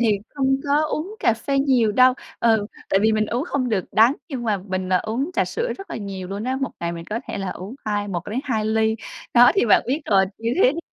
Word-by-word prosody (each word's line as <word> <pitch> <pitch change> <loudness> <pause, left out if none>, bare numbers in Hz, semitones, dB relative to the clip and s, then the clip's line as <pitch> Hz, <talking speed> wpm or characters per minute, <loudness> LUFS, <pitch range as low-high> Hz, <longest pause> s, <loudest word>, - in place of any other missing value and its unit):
thì 215 -4 +2 0.2
không 270 -1 +2
có 290 +1 +2
uống 330 +7 -4
cà - - +4
phê 275 +4 -1
nhiều 255 -6 +3
đâu, 255 +3 +5 0.3
ừ, 220 -3 +3 0.2
tại 195 - +3
vì 220 0 +4
mình 215 0 +1
uống 240 +6 -2
không 275 -7 -1
được 200 -5 0
đắng. 230 +5 +5
Nhưng 265 -5 -4
mà 215 -3 +1
mình, 185 -1 -4
ờ, 185 -1 +3
uống 250 +9 -2
trà - - +1
sữa 475 +1 -2
rất 390 - -10
là - - -4
nhiều 195 -3 -6
luôn 200 +2 -4
á, 260 +1 -1
một 270 - -1
ngày 170 0 -2
mình 170 -1 -7
có 215 +6 -4
thể - - -4
là 195 -2 -3
uống 195 +7 -7
hai 205 -1 -1
một 175 -3 -4
đến 235 +5 -2
hai 225 -6 -1
ly. 220 0 +2 0.4
Đó 245 +1 +8
thì 390 - +2
bạn 210 - +5
biết 270 +6 0
rồi, 195 -2 +4
như 230 +1 -1
thế 255 - +6
thì 325 - -6
225 Hz, 265 wpm, -22 LUFS, 205-265 Hz, 0.4 s, Đó